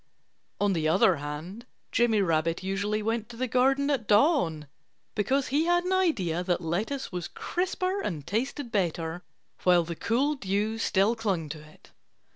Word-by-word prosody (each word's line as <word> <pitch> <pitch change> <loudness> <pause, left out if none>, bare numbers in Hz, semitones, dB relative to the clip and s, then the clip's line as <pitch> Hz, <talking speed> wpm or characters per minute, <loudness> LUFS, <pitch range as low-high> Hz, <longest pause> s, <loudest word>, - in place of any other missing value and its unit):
On 205 -1 +2
the 160 -3 0
other 180 +1 +4
hand, 155 - -7 0.2
Jimmy 225 -4 +3
Rabbit 165 0 0
usually 200 +3 -1
went 225 0 -2
to 235 - -10
the 255 +1 -1
garden 270 +3 +2
at 240 -7 -1
dawn, 205 - +3 0.5
because 260 +6 0
he 295 +5 +2
had 350 0 +3
an 365 +1 -1
idea 200 - +1
that 180 -1 0
lettuce 200 - -3
was 180 -2 -4
crisper 370 +2 -2
and 155 - -4
tasted 240 - -2
better 170 -4 -1 0.4
while 180 -1 +4
the 170 +1 -5
cool 255 - +1
dew 210 -2 -1
still 205 +1 +2
clung 195 -9 -2
to 155 +1 -6
it. 155 0 -18
205 Hz, 160 wpm, -28 LUFS, 170-255 Hz, 0.5 s, other